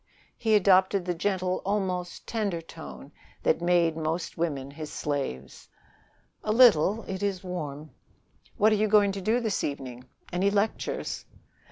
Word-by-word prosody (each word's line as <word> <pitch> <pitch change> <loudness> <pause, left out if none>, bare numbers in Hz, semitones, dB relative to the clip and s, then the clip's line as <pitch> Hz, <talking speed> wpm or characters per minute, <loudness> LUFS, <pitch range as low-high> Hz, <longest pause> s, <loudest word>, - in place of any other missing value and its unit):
He 220 -2 +2
adopted 190 -1 +4
the 180 - 0
gentle, 185 +1 -1
almost 185 -3 -2
tender 205 -7 -2
tone 70 - -10 0.3
that - - +2
made 175 -2 +3
most 165 +2 -3
women 140 -5 -2
his 155 +1 -7
slaves. 135 - -4 0.7
"A 215 - 0
little. 220 -3 +5
It 190 0 -5
is 195 -2 -1
warm." 155 -5 -5 0.7
"What 215 +2 +5
are - - +4
you 215 +1 +2
going 205 -1 +5
to 195 0 -5
do 220 +6 +2
this 220 -4 -1
evening? 130 -3 -5 0.3
Any 185 +3 +2
lectures?" 205 +2 -2
180 Hz, 145 wpm, -27 LUFS, 155-205 Hz, 0.7 s, little